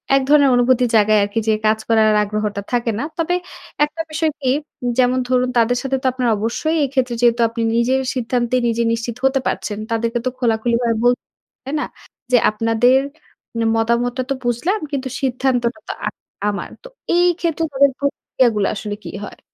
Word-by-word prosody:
এক 275 - +4
ধরণের 285 -1 +5
অনুভূতির 245 0 +3
জায়গায় 215 0 +5
আরকি 205 +3 -1
যে 220 - +4
কাজ 215 0 +3
করার 220 -1 +4
আগ্রহটা 210 -1 -2
থাকে 235 -1 +1
না। - - -2
তবে 340 +1 0 0.5
একটা 300 +2 -6
বিষয় 315 0 0
কি 260 - 0 0.5
যেমন 255 0 +3
ধরুন 250 0 +2
তাদের 235 +1 +3
সাথে 270 0 -1
তো - - -10
আপনার 250 -1 -1
অবশ্যই 235 +9 -1
এই 275 - 0
ক্ষেত্রে 255 -3 0
যেহেতু 240 0 +3
আপনি 230 0 -4
নিজের 250 +3 +2
সিদ্ধান্ত 245 -1 -1 0.2
নিজে 235 0 +1
নিশ্চিত 230 0 -3
হতে 270 0 +3
পারছেন, 210 - -3
তাদেরকে 230 +1 0
তো - - +2
খোলাখুলিভাবে 235 0 +1
বলতে 245 0 +3
হবে। - - -82
তাই 275 - -5
না? - - -1 0.5
যে 250 - +6
আপনাদের 225 +4 +3 0.6
মানে 230 -1 -1
মতামতটা 235 +3 0
তো - - +2
বুঝলাম। 280 - 0
কিন্তু 270 -2 -2
সিদ্ধান্তটা 255 0 0
তো - - -2
আ - - 0 0.4
আমার। 200 - -4
তো - - -9 0.3
এই 355 0 +4
ক্ষেত্রে 330 -1 -1
তাদের 280 +1 +4
প্রতিক্রিয়াগুলা 245 -6 0
আসলে 205 0 -4
কী - - -7
হয়? - - -9
245 Hz, 180 wpm, -19 LUFS, 230-265 Hz, 0.6 s, যে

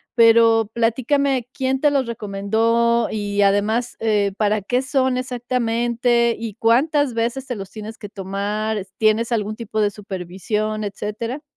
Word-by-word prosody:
Pero 230 -1 +5
platícame, 255 +2 +1
¿quién 265 0 -1
te 295 - +5
los 275 -3 +1
recomendó?, 230 +2 +1
y, 205 -1 -1
además, 210 +4 +1
eh, 210 -3 +1
¿para 210 0 +1
qué 245 +6 0
son 260 -1 +1
exactamente 240 -1 0
y 225 -2 -5
cuántas 265 +4 +2
veces 240 +4 -2
te 250 - -3
los 195 -1 -8
tienes 220 +1 -8
que 205 - -9
tomar 205 +2 -3
es 190 -1 -7
tienes 220 +2 +2
algún 215 -2 -1
tipo 220 -2 -3
de 205 - +3
supervisión, 205 +2 -4
etcétera? 210 +6 -4
225 Hz, 145 wpm, -21 LUFS, 210-245 Hz, -, Pero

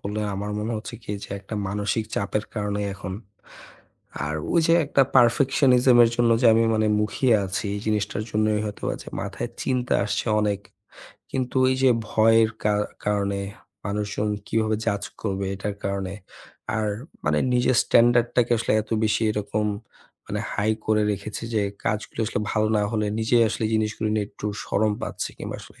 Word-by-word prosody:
বললেন, 105 +1 -3
আমার 105 +2 -4
মনে 110 +2 -2
হচ্ছে 110 +2 -7
কি 105 - -7
যে - - -13
একটা 100 +2 -7
মানসিক 105 +2 -1
চাপের 105 +1 -1
কারণেই 105 -1 -2
এখন, 95 -1 -6 1.1
আর 75 - -2 0.2
ওই 170 - +5
যে 165 - +5
একটা 140 - +4
perfectionism 125 0 +5
এর 115 - +2
জন্য 120 -1 +3
যে - - +6
আমি 115 - +4
মানে 110 0 +2
মুখিয়ে 115 +3 +2
আছি 95 - -3
এই 100 - -4
জিনিসটার 105 0 0
জন্যই 105 0 +1
হয়তোবা 105 -1 -3
যে - - -10
মাথায় - - -4
চিন্তা 125 -1 0
আসছে 105 +1 -2
অনেক। 105 -1 0 0.7
কিন্তু 130 0 -2
ওই 130 - +3
যে 130 - +6 0.2
ভয়ের 110 0 +4
কা 105 0 +3 0.3
কারণে 100 -1 0 0.5
মানুষজন 105 +1 -2 0.2
কিভাবে 110 -1 +1
judge 100 0 -1
করবে 100 -2 -2
এটার 100 +1 -3
কারণে, 100 -1 -2 0.6
আর 110 -1 0 0.4
মানে 75 +1 +2 0.2
নিজের 125 0 +3
standard 120 0 +4
টাকে 120 -1 +3
আসলে 115 - 0
এত 110 - -20
বেশি 110 +1 +1
এরকম 105 0 -1 0.6
মানে - - -3
high 110 +1 +1
করে 110 -1 +3
রেখেছি 105 +3 -6
যে 105 - +2 0.2
কাজগুলো 105 +1 -2
আসলে 105 - -2
ভালো 110 0 +2
না 105 - +2
হলে 105 -1 0
নিজেই 115 +1 +4
আসলে - - -2
জিনিসগুলি 110 0 0
নিয়ে 105 -2 0
একটু 105 - -7 0.2
শরম 105 +1 +1
পাচ্ছি - - -3
কিংবা - - -5
আসলে - - -16
105 Hz, 165 wpm, -24 LUFS, 105-115 Hz, 1.1 s, যে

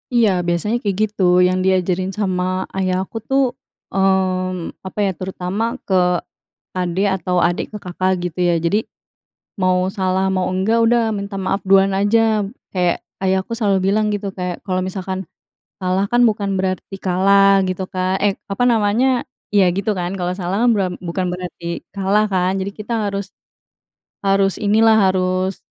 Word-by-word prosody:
Iya, 230 -3 +5 0.2
biasanya 175 +6 0
kayak 200 -5 -1
gitu. 210 -1 -7 0.3
Yang 185 0 0
diajarin 185 0 +1
sama 185 -3 0 0.3
ayah 185 -1 +1
aku 225 - -8
tuh, 270 +1 +3 0.5
mmm, 185 -2 0
apa 190 +2 -6
ya, 195 - +1
terutama 185 +2 -3 0.2
ke 195 - -2 0.9
adik, 180 +2 0
atau 180 -1 -2
adik 175 0 -1
ke 210 - -5
kakak, 185 +1 0
gitu 180 0 -5
ya. 175 - +3
Jadi, 170 +5 +2 0.8
mau 185 0 +3 0.2
salah 190 0 +1
mau 185 -1 0
enggak, 190 +5 +1
udah, 240 0 +3
minta 200 -1 -4
maaf 195 +1 -1
duluan 195 0 +5
aja. 215 +2 +2 0.3
Kayak, 180 -2 0 0.2
ayahku 190 +3 0
selalu 210 -4 +1 0.2
bilang, 215 0 +2
gitu, 200 -1 -3
kayak, 180 -2 -5
kalau 185 -2 -1
misalkan 185 0 -4 0.6
kalah 185 +2 +1
kan 240 +3 +3
bukan 210 -3 +1
berarti 190 +1 -2
kalah, 195 +1 +4
gitu 185 +1 -2
Kak 185 0 0
eh, 200 -2 +1
apa 200 +4 -1
namanya 235 +4 +2 0.3
iya, 200 -1 +5
gitu 200 +2 0
kan. 175 +2 -3
Kalau 180 -2 -2
salah 180 +1 -2
kan, 245 - +5
bura 200 -4 +1 0.2
bukan 180 +2 -1
berarti 180 -1 -7 0.3
kalah, 200 +2 +2
kan. 185 -1 +1
Jadi 195 +1 -3
kita 215 +3 -4
harus 200 0 -3 1.0
harus 195 -1 +2
inilah, 220 +2 +5 0.2
harus 185 0 -1
190 Hz, 155 wpm, -19 LUFS, 185-205 Hz, 1.0 s, Iya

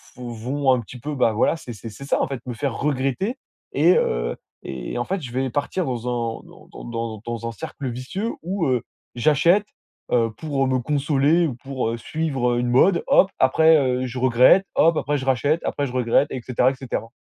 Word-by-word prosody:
p 125 - -13
vont 125 +4 -1
un 125 - 0
petit 125 +3 -11
peu, 145 +4 -5
bah, 115 -3 +3
voilà, 115 - +2
c'est 125 -6 -9
c'est 115 +1 -9
c'est 110 +6 -11
ça - - +1
en - - +1
fait 135 -3 -5
me 125 - -4
faire 130 +1 -3
regretter 145 - -1 0.4
et, 165 +6 +5
heu, - - 0 0.3
et 65 - -5
en 120 - -1
fait, 190 -2 -2
je 125 -3 -7
vais 130 0 0
partir 145 +7 -2
dans 125 -3 -3
un 115 -2 -2
dans - - -16
dans - - -11
dans 115 -2 -4
dans 115 0 -4
un - - -3
cercle 130 +5 -6
vicieux 150 - -4
où, 185 0 -1
heu, 125 -3 +1 0.3
j'achète, 160 - +3 0.5
heu, 115 -2 +2
pour, 145 -3 -1
heu, - - 0
me 130 - +2
consoler 145 +4 +2
ou 130 - -4
pour, 130 -2 -3
heu, 115 - -3
suivre, 135 -1 -1
heu, 120 - 0
une 125 - -1
mode. 170 +9 +4
Hop, 195 - +5
après, 160 +5 +5
heu, 130 -2 0
je 125 +1 -5
regrette. 130 +9 +5
Hop, 165 0 +4
après, 145 0 0
je 130 - -5
rachète. 140 +5 +1
Après, 140 -1 -1
je 125 - -8
regrette, 125 +3 +2
et 130 - -4
cetera, 125 0 +2
et - - -7
cetera. 130 -3 -4
130 Hz, 225 wpm, -23 LUFS, 120-150 Hz, 0.5 s, et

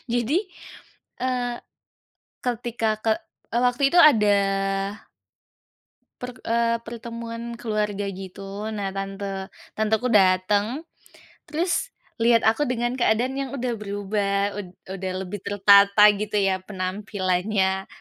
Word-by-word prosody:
Jadi, 245 +7 +2 0.8
eee, 245 -1 -1 0.9
ketika 235 -2 -1 0.2
ke 220 - +4 0.4
eee, 235 - +2
waktu 250 +2 +1
itu 355 - +5
ada 270 -10 +7 2.0
perk 250 0 -6
eee, 230 0 +2
pertemuan 235 0 -6
keluarga 210 -3 -2
gitu. 195 +2 -7
Nah, 195 -2 -3
tante 195 0 -4 0.2
tanteku 220 +3 0
dateng. 205 - +3 0.6
Terus 345 +8 0 0.3
liat 230 0 +4
aku 235 +6 +3
dengan 240 -1 -1
keadaan 240 +3 +2
yang 275 -1 -3
udah 250 -2 -2
berubah, 200 0 -1
ud 185 - -7 0.2
udah 190 -1 -4
lebih 200 +3 -6
tertata 200 +1 +5
gitu 210 +1 -4
ya 195 -2 +2
penampilannya. 190 0 -1
215 Hz, 105 wpm, -24 LUFS, 195-235 Hz, 2.0 s, ada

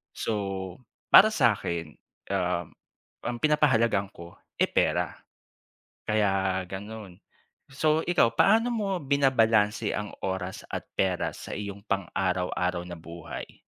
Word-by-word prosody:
So, 115 - -2 0.8
para 210 - +10
sa'kin, 85 - 0 0.4
uhm, 90 -3 0 0.6
ang 120 0 -3
pinapahalagahan 115 -10 +3
ko, 85 0 -11 0.3
eh - - +5
pera. - - +1 1.0
Kaya 95 -3 +1
ganun. 100 -1 -8 0.5
So, 155 +3 +2
ikaw, 175 -10 +4
paano 225 +4 +4
mo 210 -4 -1
binabalanse 115 -6 +2
ang 105 -1 -4
oras 95 -1 -3
at - - -4
pera 95 -2 0
sa - - -9
iyong 100 -1 -6
pang-araw-araw 90 -2 -1
na 85 - -7
buhay? 85 0 -9
100 Hz, 110 wpm, -27 LUFS, 90-120 Hz, 1.0 s, para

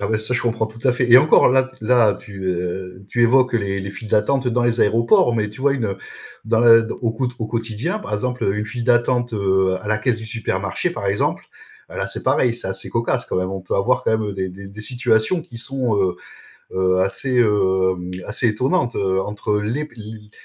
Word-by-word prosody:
Ah 100 - -2
ouais. 110 - +1
Ça, 110 +3 -5
je - - 0
comprends 115 -2 0
tout 115 +3 -7
à 125 - +4
fait 125 -1 -1
et 125 - +10
encore 155 +3 +5
là 130 +1 +2
là, 115 -2 +3
tu, 100 -2 -10
heu, 90 +1 -4
tu 120 - 0
évoques 125 +2 +4
les 100 -3 -1
les 100 - -5
files 110 +2 -9
d'attente 125 +6 +1
dans 120 0 +1
les 120 0 +1
aéroports 115 +2 +3
mais 105 -2 -1
tu 105 - -13
vois, 140 0 +3
une, 130 -5 -1
heu, 100 -1 -3 0.5
dans 110 +1 +2
le 115 -1 +6
au 115 -2 0
quo 125 +3 -2
au 110 - -3
quotidien, 115 - -3
par 105 - -5
exemple 125 +4 -2
une 105 +1 -3
file 120 +2 -5
d'attente, 120 0 +2
heu, 95 -2 +1
à 105 - -8
la 110 0 +1
caisse 115 +1 0
du 110 - -8
supermarché 115 0 -2
par - - -5
exemple, - - -1 0.4
là - - -4
c'est - - -7
pareil. 120 -2 +2
C'est 105 - -7
assez 95 - -6
cocasse 120 +2 -1
quand - - -3
même. 90 0 -1
On 95 0 -4
peut 90 - -4
avoir 125 +5 +1
quand - - +2
même 105 -2 -3
des 95 -1 -2
des 95 +2 -10
des 100 +2 -11
situations 125 +6 0
qui 115 - -12
sont, 125 -3 -2
heu 95 -3 +1 0.6
heu, 95 0 +2
assez, 125 +6 0
hem, 95 -4 +1
assez 115 +4 -1
étonnantes, 125 - 0
heu, 95 -1 0
entre 105 +1 -2
les 115 +8 -2
p 125 - -18
l 110 - -9
les 105 0 -11
110 Hz, 230 wpm, -20 LUFS, 100-120 Hz, 0.6 s, et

